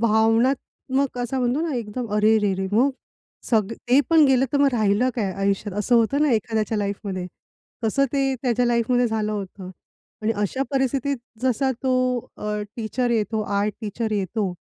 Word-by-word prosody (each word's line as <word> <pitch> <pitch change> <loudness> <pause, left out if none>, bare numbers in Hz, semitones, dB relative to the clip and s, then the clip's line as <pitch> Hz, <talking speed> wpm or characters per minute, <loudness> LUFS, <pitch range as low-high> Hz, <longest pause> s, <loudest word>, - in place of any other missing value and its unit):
भावनात्मक 240 +4 +1
असा 245 +2 -2
म्हणतो 250 +3 +1
ना, 325 -3 -1
एकदम 235 +1 -4
अरे 215 +1 +4
रे 205 -2 +1
रे! 190 0 -2
मग, 250 +7 +4 0.6
सगळं 220 -2 +2
ते 255 +3 +6
पण 325 -2 +7
गेलं, 265 -1 +4
तर 285 - +2
मग 280 0 +5
राहिलं 220 +2 +2
काय 205 -6 -1
आयुष्यात, 195 +1 -1
असं 210 +4 +2
होतं 235 +5 +3
ना 300 - +3
एखाद्याच्या 220 -1 0
लाईफमध्ये. 200 -2 -3 0.6
तसं 275 +6 +2
ते 270 -1 +1
त्याच्या 245 -1 +1
लाईफमध्ये 240 +1 +2
झालं 215 -1 -1
होतं 195 -2 -6 0.5
आणि 220 +1 +1
अशा 210 +6 -1
परिस्थितीत 275 0 0 0.2
जसा 260 +1 +1
तो 260 -1 +1 0.4
अ, 210 0 -3
टीचर 240 +2 -1
येतो, 220 -1 0
आर्ट 200 +1 -1
टीचर 220 +1 -3
येतो 200 -1 -1
225 Hz, 165 wpm, -23 LUFS, 210-255 Hz, 0.6 s, पण